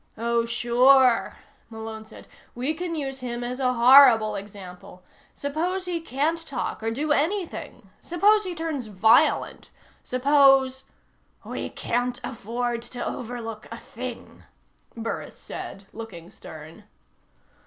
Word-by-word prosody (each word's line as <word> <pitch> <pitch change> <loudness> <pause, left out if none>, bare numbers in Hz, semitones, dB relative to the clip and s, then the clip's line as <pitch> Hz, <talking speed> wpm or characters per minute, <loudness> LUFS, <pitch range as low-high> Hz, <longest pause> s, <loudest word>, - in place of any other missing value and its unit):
"Oh, 235 +1 0
sure," 245 +2 +4 0.3
Malone 220 -1 -8
said. 220 - -14 0.3
"We 255 +6 -1
can 340 +1 -4
use 270 -3 -4
him 240 -1 -4
as 250 +2 -4
a 255 -1 +1
horrible 240 -3 +7
example. 190 -3 -10 0.3
Suppose 345 +6 -2
he 345 -2 -2
can't 315 +3 -1
talk, 280 - -4
or 225 - -1
do 290 +7 -2
anything? 335 +6 -2
Suppose 415 +5 +3
he 365 -3 -5
turns 315 -7 -4
violent? 220 +9 +2 0.3
Suppose 270 0 +3 0.3
" - - -36
"We - - -5
can't 245 +1 -2
afford 235 +1 -3
to 245 +1 -6
overlook 225 -2 -6
a - - -6
thing," - - -9 0.6
Burris 230 0 -5
said, 195 - -8
looking 190 -6 -9
stern. 160 +3 -12
245 Hz, 120 wpm, -25 LUFS, 225-285 Hz, 0.6 s, horrible